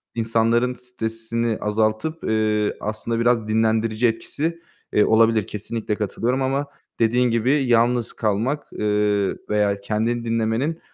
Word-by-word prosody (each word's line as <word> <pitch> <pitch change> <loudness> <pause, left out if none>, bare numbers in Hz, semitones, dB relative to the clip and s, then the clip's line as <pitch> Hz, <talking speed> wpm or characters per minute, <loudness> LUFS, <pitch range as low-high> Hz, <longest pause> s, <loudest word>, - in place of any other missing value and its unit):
insanların 115 +2 +1
stresini 115 -2 -3
azaltıp, 110 +9 -1
eee, 110 -1 +1
aslında 110 +2 -3
biraz 115 -2 +2
dinlendirici 110 +1 +2
etkisi, 160 +8 -3 0.3
eee, 105 - +4
olabilir. 110 -1 +3
Kesinlikle 105 +1 -4
katılıyorum 115 +5 -1
ama 135 +2 0 0.3
dediğin 120 +2 +3
gibi 115 +3 +2 0.2
yalnız 120 0 +2
kalmak, 115 +7 -1
eee, 105 -2 +1
veya 105 -1 +2
kendini 115 +3 -1
dinlemenin, 115 +8 0
115 Hz, 115 wpm, -22 LUFS, 110-120 Hz, 0.3 s, eee